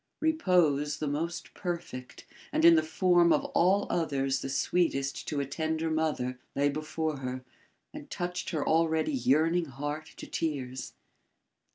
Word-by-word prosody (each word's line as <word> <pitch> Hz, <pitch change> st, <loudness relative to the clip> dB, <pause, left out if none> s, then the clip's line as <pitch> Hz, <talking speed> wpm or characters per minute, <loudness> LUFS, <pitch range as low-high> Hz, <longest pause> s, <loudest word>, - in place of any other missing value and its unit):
Repose 175 Hz, -, +2 dB
the 155 Hz, -, -3 dB
most 165 Hz, +4 st, -3 dB
perfect 170 Hz, -8 st, -6 dB, 0.3 s
and 160 Hz, -, +2 dB
in 170 Hz, -, +10 dB
the 160 Hz, -, +5 dB
form 170 Hz, +2 st, +3 dB
of -, -, +3 dB
all 190 Hz, +4 st, +3 dB
others 135 Hz, -5 st, 0 dB
the -, -, -4 dB
sweetest 140 Hz, -1 st, 0 dB
to 145 Hz, -, -1 dB
a 140 Hz, -, 0 dB
tender 160 Hz, +2 st, -2 dB
mother, 150 Hz, -6 st, -1 dB, 0.2 s
lay 140 Hz, +1 st, +3 dB
before 155 Hz, +1 st, -2 dB
her 130 Hz, -1 st, -5 dB, 0.5 s
and 295 Hz, -1 st, -9 dB
touched 180 Hz, -6 st, -3 dB
her 155 Hz, -5 st, -2 dB
already 160 Hz, -, +2 dB
yearning 165 Hz, -, +2 dB
heart 145 Hz, +3 st, -5 dB
to -, -, -7 dB
tears. 130 Hz, -5 st, -3 dB
155 Hz, 145 wpm, -29 LUFS, 140-170 Hz, 0.5 s, in